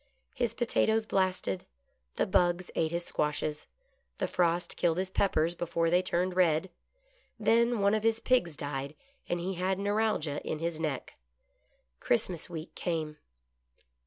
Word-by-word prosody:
His 240 -4 -1
potatoes 225 -2 +2
blasted, 185 - 0 0.5
the - - +1
bugs 175 0 +2
ate 160 - +1
his 170 +1 -2
squashes, 150 0 -2 0.5
the - - -1
frost 175 -1 +1
killed 170 -1 +1
his 190 0 -1
peppers 170 -4 +2
before 170 -1 0
they 180 +1 +5
turned 180 0 0
red. 175 0 +3 0.7
Then 230 +1 +3
one 200 +1 +4
of 215 - +2
his 225 0 +2
pigs 175 - +1
died, 140 0 -4 0.3
and 175 - 0
he 185 +3 -2
had 185 +1 0
neuralgia 205 -7 0
in 155 - -2
his 165 0 -3
neck. 150 -5 -4 0.8
Christmas 185 -9 0
week 165 -1 -7
came. 160 -3 -3
175 Hz, 140 wpm, -30 LUFS, 160-200 Hz, 0.8 s, they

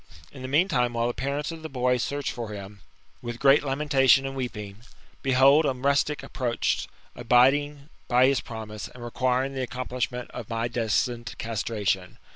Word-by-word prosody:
In 135 - -11
the 130 - -5
meantime, 135 -5 +2
while 115 0 0
the 120 - 0
parents 140 +5 -3
of 165 -1 -8
the 160 - -6
boy 125 -2 +1
search 140 +3 -2
for 120 -3 -6
him, 100 -1 -9 0.4
with 120 -1 -5
great 140 +3 +5
lamentation 135 -1 +3
apd 135 - -4
weeping, 105 -7 -5 0.4
behold 135 +3 +5
a 140 -3 +1
rustic 140 +3 +1
approached, 120 -3 -1 0.3
abiding 140 +4 +3 0.2
by 125 +1 +5
his 135 0 +2
promise, 110 -2 -7
and 125 - -12
requiring 130 +2 0
the 130 -2 -3
accom 125 +2 -5
plishment 125 -1 -3
of 120 -4 -8
my 115 0 -1
destined 120 0 -1
castration. 105 -4 -2
125 Hz, 165 wpm, -26 LUFS, 115-135 Hz, 0.4 s, great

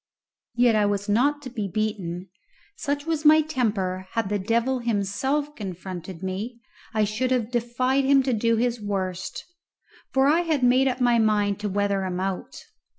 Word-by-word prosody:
Yet 235 -3 +4
was 205 0 -2
I 205 - +2
not 290 +6 +2
to 255 - -7
be 215 -5 -3
beaten. 190 -4 -3 0.5
Such 285 0 -3
was 320 -2 -1
my 310 +1 +7
temper, 205 -11 -1
had 225 -4 -1
the 205 0 0
devil 235 +6 +1
himself 240 +7 -1
confronted 185 -2 -7
me, 205 +6 -4 0.3
I 215 -1 +1
should 220 +5 -1
have 245 -3 0
defied 255 +3 +1
him 275 0 +5
to 260 -1 0
do 230 +1 +2
his 240 0 0
worst, 185 -3 -3 0.7
for 265 0 +3
I 305 +4 +4
had 320 -6 0
made 255 +2 +4
up 255 0 -1
my 240 -1 +4
mind 210 -2 +2
to 210 0 -2
weather 200 0 0
him 185 -1 -3
out. 190 0 -4
225 Hz, 170 wpm, -25 LUFS, 200-260 Hz, 0.7 s, my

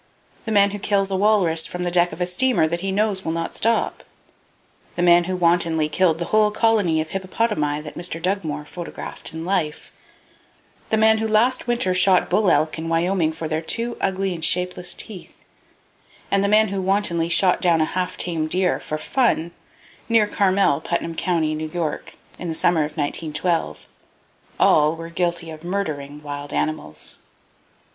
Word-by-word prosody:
The 220 - -3
man 200 -1 +4
who 205 - -5
kills 195 0 0
a - - 0
walrus 190 -5 +2
from 180 0 -5
the 175 - -1
deck 175 0 +3
of 155 - -9
a 180 - +1
steamer 180 -1 +2
that 170 +2 -2
he 195 +2 -2
knows 200 -1 0
will 160 - -2
not 165 0 -3
stop; 230 +1 0 0.9
the 175 - -1
man 175 0 +5
who 185 +1 -2
wantonly 170 -3 +2
killed 165 0 +2
the 170 - -3
whole 215 +2 +3
colony 210 -7 +2
of 155 - -6
hippopotami 185 -6 -1
that 150 -1 -9
Mr. 175 -1 -4
Dugmore 160 -5 -2
photographed 170 +2 -6
in 160 +1 -6
life; 175 -5 -2 1.0
the 220 - +2
man 220 0 +4
who 220 - -1
last 230 +4 +2
winter 240 -6 0
shot 185 0 +3
bull 200 +1 +3
elk 155 -1 +1
in 165 0 -4
Wyoming 165 0 +1
for 160 0 -5
their 155 +1 -2
two 230 +8 -2
ugly 190 0 -1
and 165 -2 -7
shapeless 180 +1 +1
teeth, 195 -5 -10 0.9
and 195 0 +2
the - - +2
man 215 +1 +4
who 195 0 -2
wantonly 185 -4 0
shot 180 +1 +3
down 170 -2 +3
a 155 - +3
half 180 +2 -3
tame 165 -3 -2
deer 180 +3 +1
"for 155 - -4
fun" 170 - 0 0.6
near 225 -2 +4
Carmel, 195 -7 +2
Putnam 170 0 -2
County, 165 -2 0
New 155 0 -4
York, 160 -2 -4 0.3
in 180 - -5
the 160 - -2
summer 165 -1 +3
of 150 0 -9
1912,—all 155 0 -1
were 165 0 -8
guilty 170 -1 -2
of 155 0 -10
murdering 150 -6 -4
wild 145 0 -6
animals. 155 0 -3
175 Hz, 175 wpm, -22 LUFS, 160-195 Hz, 1.0 s, man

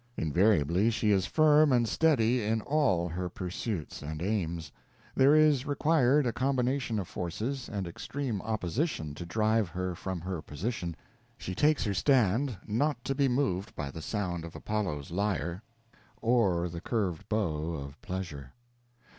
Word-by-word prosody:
Invariably 90 +3 +3
she 110 -2 +1
is 95 -2 +2
firm 155 -1 +5
and 120 -2 +3
steady 125 -5 +3
in 110 +1 0
all 130 - +1
her 90 +2 -3
pursuits 90 -1 -4
and 75 +2 -5
aims. 85 -5 -2 0.4
There 140 +3 +5
is 150 -4 +4
required 145 -1 +3
a 120 - 0
combination 130 -2 0
of 95 -4 -3
forces 110 +10 -4
and 100 -4 -3
extreme 115 +5 -4
opposition 110 - -2
to 85 +4 -7
drive 110 +1 +1
her 90 +1 -3
from 95 +1 -4
her 90 -2 -4
position; 85 - -4 0.4
she 95 - -5
takes 150 +9 +3
her 105 - 0
stand, 125 +1 +2
not 120 +4 0
to 135 - -1
be 140 0 +2
moved 125 -7 -1
by 70 -1 -4
the 80 - -7
sound 90 -3 -3
of 85 - -9
Apollo's 90 -10 -3
lyre 95 -1 -1 0.6
or 100 -8 +2
the 85 -1 -7
curved 95 -9 -2
bow 85 -7 -1
of 70 0 -8
pleasure. 80 -8 -6
105 Hz, 150 wpm, -30 LUFS, 85-125 Hz, 0.6 s, firm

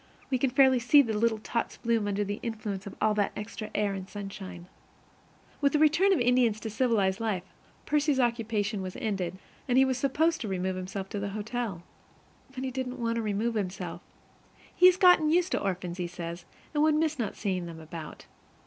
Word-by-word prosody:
We 255 - +2
can 270 - +2
fairly 260 -1 +5
see 285 +5 +6
the 225 -4 -2
little 220 +1 +2
tots 230 +2 -3
bloom 230 -3 0
under 205 0 0
the 205 +1 -4
influence 210 -4 -4
of 200 - -8 0.2
that 205 - +1
extra 210 +1 -6
air 205 -1 +1
and 190 -1 -6
sunshine. 195 -3 -7 1.0
With 280 -1 +3
the - - +4
return 315 +6 +4
of 380 - +4
the 240 - +1
Indians 245 -3 +3
to 220 - -4
civilized 210 -4 +1
life, 210 -6 -1 0.4
Percy's 295 -2 +2
occupation 225 -4 0
was 185 -1 -6
ended, 190 -4 -2 0.3
and 250 -1 +2
he 265 - +7
was 260 -1 -1
supposed 315 +5 +1
to 225 - -3
remove 190 -1 -1
himself 190 +1 -5
to 205 - -4
the 200 0 -3
hotel. 215 -5 -4 0.7
But 260 - -4
he 260 - -2
didn't 255 0 -4
want 230 -1 -1
to - - 0
remove 215 +2 -1
himself. 185 -4 -4 0.7
He 365 - +7
has 365 0 +5
got 360 -4 +7
used 345 +4 +2
to - - 0
orphans, 180 -2 -3
he 175 - -1
says, 170 0 -7 0.3
and 295 - +1
he - - +5
would 310 -1 +4
miss 310 -2 0
not 215 -4 -2
seeing 185 -4 -2
them 165 -1 -8
about. 160 0 -9
220 Hz, 205 wpm, -28 LUFS, 195-260 Hz, 1.0 s, he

